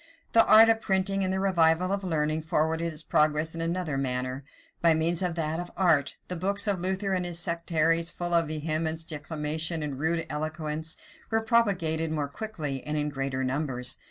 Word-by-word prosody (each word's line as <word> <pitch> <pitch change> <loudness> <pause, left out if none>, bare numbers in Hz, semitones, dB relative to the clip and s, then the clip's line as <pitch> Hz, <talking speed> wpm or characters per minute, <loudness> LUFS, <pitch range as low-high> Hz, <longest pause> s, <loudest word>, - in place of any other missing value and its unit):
The 225 - +7
art 220 +1 +8
of 225 0 +3
printing 195 -1 0
and 185 - 0
the 190 - -1
revival 180 -1 +2
of 200 0 -1
learning 155 -3 0
forwarded 160 +1 0
its 155 0 -4
progress 155 +1 +2
in 165 - -5
another 165 -4 -2
manner. 130 0 -2 0.4
By 165 -1 +5
means 165 +2 0
of 180 -2 -1
that 165 +2 -3
art, 165 -7 +2
the 180 - -3
books 200 +4 0
of 200 -3 +1
Luther 190 +2 0
and 180 -1 0
his 175 -1 -3
sectaries 170 -1 +1
full 175 0 -3
of 165 -2 +3
vehemence, 160 +1 -2
declamation, 155 +1 -2
and 150 -2 -3
a - - -7
rude 165 +3 0
eloquence, 155 +1 -3 0.3
were 225 0 +1
propagated 190 -9 +1
more 150 -2 -2
quickly, 150 - -5
and 150 0 -3
in 150 0 0
greater 135 -2 -3
numbers. 130 -2 -1
165 Hz, 185 wpm, -27 LUFS, 150-180 Hz, 0.4 s, art